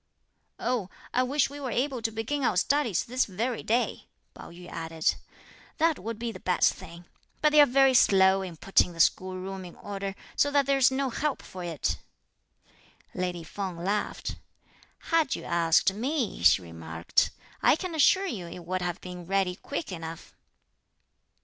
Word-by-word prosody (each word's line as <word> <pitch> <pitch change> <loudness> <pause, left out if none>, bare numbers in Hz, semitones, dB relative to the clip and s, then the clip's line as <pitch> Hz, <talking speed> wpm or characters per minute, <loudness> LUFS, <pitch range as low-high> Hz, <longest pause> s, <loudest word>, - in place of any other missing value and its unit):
"Oh, 240 -7 -1 0.2
I 250 - +3
wish 270 +3 +2
we 290 - -8
were 270 -3 -4
able 255 +1 -1
to 225 - 0
begin 225 +6 -3
our 190 - +2
studies 255 - +2
this 255 +2 0
very 225 +5 -2
day," 235 +3 -1 0.3
Pao - - -11
yü 175 +1 -12
added; 165 -1 -1 0.6
"that 325 -1 +2
would 225 +3 -5
be 230 +1 -3
the - - -10
best 180 - +2
thing, 170 +1 -12 0.3
but 300 - +3
they're 295 -1 +7
very 270 +1 +4
slow 195 -5 +5
in 180 -4 -7
putting 180 0 +2
the 165 - -12
school 185 +3 +2
room 190 +1 -6
in 175 - -10
order, 195 -1 -5 0.2
so 285 - +3
that 285 -1 +3
there's 275 -1 +4
no 265 0 -1
help 295 +3 -2
for 185 -1 -8
it!" 165 -4 -2 1.1
Lady 180 -2 -3
Feng 185 +1 -5
laughed. 200 +5 -2 0.7
"Had 325 -5 +3
you - - -7
asked 170 +2 +3
me," 250 - -2
she 90 +1 +5
remarked, 80 0 -1 0.3
"I - - +5
can 355 +2 -5
assure 375 +5 +4
you 200 - -4
it 170 0 -9
would 185 +1 -2
have 175 -1 -3
been 180 -2 -8
ready 190 -1 +1
quick 285 - -5
enough." 165 -2 -7
195 Hz, 170 wpm, -28 LUFS, 175-265 Hz, 1.1 s, they're